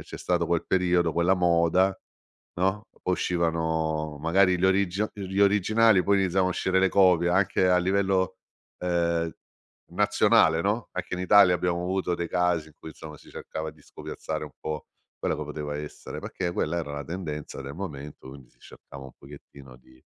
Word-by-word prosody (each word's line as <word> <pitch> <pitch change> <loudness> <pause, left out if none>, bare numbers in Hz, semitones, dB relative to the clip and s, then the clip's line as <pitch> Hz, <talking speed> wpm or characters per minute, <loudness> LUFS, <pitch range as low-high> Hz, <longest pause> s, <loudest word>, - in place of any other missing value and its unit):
c'è - - -10
stato 85 -2 0
quel 85 0 0
periodo, 90 -3 +2
quella 85 +3 +2
moda, 90 +2 +2 0.6
no? 95 +4 -1 0.2
Uscivano, 80 -4 -1
magari, 90 +3 +3
gli 95 - 0
origi 95 +1 +2
gli 100 -2 -5
originali, 105 0 +4
poi 100 +2 +2
iniziavano 95 0 +1
a - - -1
uscire 95 0 0
le 95 - +4
copie 90 -3 +4
anche 95 0 +2
a 90 - +4
livello, 95 0 +1 0.4
ehm, 85 -2 0 0.6
nazionale, 80 +1 +3
no, 105 +4 -1
anche 95 0 -6
in 90 - -5
Italia 90 -1 +6
abbiamo 90 0 -1
avuto 90 -1 -1
dei 85 0 -3
casi 90 -3 0
in 75 - -21
cui - - -10
insomma 75 0 -11
si - - -18
cercava 80 0 -6
di 75 -1 -22
scopiazzare - - -6
un - - -10
po' 75 -1 -5 0.3
quello - - -1
che 75 - -4
poteva 75 0 -5
essere 75 0 -8
perché 90 -2 -4
quella 85 +1 -1
era 75 -4 -5
la 70 0 -5
tendenza 80 -6 -6
del 70 +2 -8
momento, 75 -7 -8
quindi 65 -3 -13
si - - -33
cercava 70 0 -13
un 65 - -11
pochettino 70 -2 -14
di 65 0 -22
85 Hz, 175 wpm, -26 LUFS, 80-95 Hz, 0.6 s, Italia